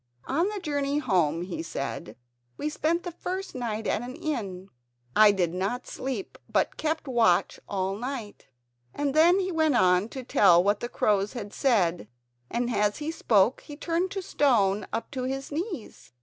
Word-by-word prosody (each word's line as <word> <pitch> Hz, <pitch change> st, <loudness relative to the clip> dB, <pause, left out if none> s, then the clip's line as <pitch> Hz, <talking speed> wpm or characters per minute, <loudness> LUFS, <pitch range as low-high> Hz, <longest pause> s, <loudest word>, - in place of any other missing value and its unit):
"On 335 Hz, +9 st, +1 dB
our 420 Hz, -, -4 dB
journey 285 Hz, -5 st, -1 dB
home," 175 Hz, -, +1 dB
he 180 Hz, -2 st, -5 dB
said, 145 Hz, -4 st, -5 dB, 0.4 s
"we 300 Hz, -, -2 dB
spent 325 Hz, +3 st, 0 dB
the 355 Hz, -, -5 dB
first 370 Hz, +3 st, -5 dB
night 225 Hz, -4 st, -3 dB
at -, -, 0 dB
an 250 Hz, +2 st, -7 dB
inn. 200 Hz, -, -4 dB, 0.5 s
I 215 Hz, -1 st, +8 dB
did 180 Hz, -4 st, 0 dB
not 195 Hz, +7 st, -2 dB
sleep 255 Hz, -6 st, -5 dB
but -, -, +1 dB
kept 315 Hz, -1 st, -2 dB
watch 230 Hz, -8 st, +2 dB
all 190 Hz, -1 st, -1 dB
night." 240 Hz, -2 st, -6 dB, 0.5 s
And 285 Hz, -2 st, -1 dB
then 340 Hz, +5 st, +5 dB
he 375 Hz, -1 st, -1 dB
went 315 Hz, -4 st, +2 dB
on 185 Hz, -1 st, +3 dB
to 260 Hz, +1 st, -7 dB
tell 180 Hz, -7 st, +5 dB
what 205 Hz, +1 st, +2 dB
the 240 Hz, -, -4 dB
crows 205 Hz, -3 st, +1 dB
had 215 Hz, -5 st, -6 dB
said, 180 Hz, -, +1 dB, 0.4 s
and 240 Hz, +1 st, -1 dB
as 210 Hz, 0 st, +1 dB
he 300 Hz, +1 st, -3 dB
spoke 225 Hz, -6 st, +2 dB
he 290 Hz, -, -10 dB
turned 340 Hz, +3 st, -1 dB
to 390 Hz, -1 st, -4 dB
stone 210 Hz, -, +2 dB
up 225 Hz, -, -4 dB
to 260 Hz, -2 st, -3 dB
his 270 Hz, +2 st, -4 dB
knees. 335 Hz, -, -6 dB
245 Hz, 175 wpm, -27 LUFS, 200-300 Hz, 0.5 s, I